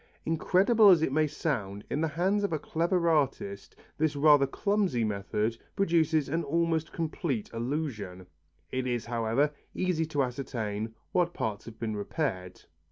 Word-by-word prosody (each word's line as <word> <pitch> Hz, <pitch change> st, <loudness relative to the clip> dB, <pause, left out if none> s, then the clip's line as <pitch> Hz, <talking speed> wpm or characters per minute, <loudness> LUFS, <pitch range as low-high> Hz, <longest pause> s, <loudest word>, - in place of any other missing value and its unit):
Incredible 195 Hz, +7 st, +4 dB
as 170 Hz, -4 st, +6 dB
it 135 Hz, -, +1 dB
may 155 Hz, +2 st, +2 dB
sound, 105 Hz, -10 st, -3 dB
in 150 Hz, -, -2 dB
the 160 Hz, -, +2 dB
hands 185 Hz, +6 st, +1 dB
of 200 Hz, -, 0 dB
a 160 Hz, -, +1 dB
clever 170 Hz, +3 st, 0 dB
artist 135 Hz, -10 st, 0 dB, 0.2 s
this 155 Hz, -1 st, +1 dB
rather 145 Hz, -1 st, +5 dB
clumsy 195 Hz, -, 0 dB
method 105 Hz, +2 st, -1 dB, 0.2 s
produces 165 Hz, -6 st, +2 dB
an 165 Hz, +1 st, -1 dB
almost 165 Hz, +1 st, 0 dB
complete 155 Hz, -, -3 dB
illusion. 115 Hz, -8 st, -3 dB, 0.5 s
It 130 Hz, 0 st, -1 dB
is, 120 Hz, -2 st, -1 dB
however, 120 Hz, +5 st, +1 dB, 0.2 s
easy 175 Hz, -4 st, 0 dB
to 145 Hz, -3 st, +1 dB
ascertain 115 Hz, -4 st, -4 dB, 0.2 s
what 175 Hz, -1 st, +1 dB
parts 105 Hz, -1 st, -3 dB
have 115 Hz, -1 st, -10 dB
been 110 Hz, -2 st, -3 dB
repaired. 100 Hz, -, -3 dB
145 Hz, 150 wpm, -29 LUFS, 115-165 Hz, 0.5 s, as